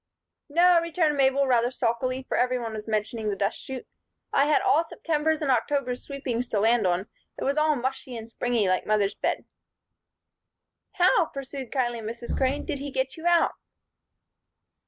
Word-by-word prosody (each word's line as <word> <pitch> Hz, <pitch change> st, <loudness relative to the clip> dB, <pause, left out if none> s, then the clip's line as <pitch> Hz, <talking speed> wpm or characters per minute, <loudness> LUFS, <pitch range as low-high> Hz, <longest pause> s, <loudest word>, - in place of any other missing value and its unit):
"No," 345 Hz, +3 st, +5 dB
returned 335 Hz, -2 st, +1 dB
Mabel, 275 Hz, 0 st, +3 dB
rather 245 Hz, -2 st, +3 dB
sulkily, 255 Hz, +1 st, -1 dB
for -, -, -1 dB
every 250 Hz, 0 st, +2 dB
one 230 Hz, -2 st, -4 dB
was 215 Hz, 0 st, -6 dB
mentioning 215 Hz, 0 st, -1 dB
the 200 Hz, -, -1 dB
dust 200 Hz, +2 st, -1 dB
chute. 265 Hz, -2 st, -6 dB, 0.5 s
"I 275 Hz, -, +4 dB
had 300 Hz, -, +3 dB
all 320 Hz, -, +4 dB
September's 315 Hz, -1 st, -1 dB
and 275 Hz, -, +2 dB
October's 250 Hz, +1 st, 0 dB
sweepings 255 Hz, -4 st, -3 dB
to 215 Hz, -, 0 dB
land 225 Hz, -1 st, +3 dB
on. 175 Hz, 0 st, +1 dB, 0.4 s
It -, -, -4 dB
was 275 Hz, -, +1 dB
all 305 Hz, 0 st, +3 dB
mushy 260 Hz, -1 st, -4 dB
and 225 Hz, 0 st, -8 dB
springy, 230 Hz, -2 st, 0 dB
like 185 Hz, 0 st, 0 dB
mother's 210 Hz, -2 st, +2 dB
bed." -, -, -2 dB, 1.5 s
"How," 360 Hz, 0 st, +4 dB
pursued 275 Hz, -2 st, -7 dB
kindly 240 Hz, -3 st, 0 dB
Mrs. 230 Hz, +2 st, -5 dB
Crane, 265 Hz, +2 st, 0 dB
"did 280 Hz, -, -3 dB
he 285 Hz, +1 st, -5 dB
get 265 Hz, -1 st, -2 dB
you 325 Hz, +1 st, -4 dB
out?" 345 Hz, -1 st, +4 dB
260 Hz, 170 wpm, -26 LUFS, 230-285 Hz, 1.5 s, No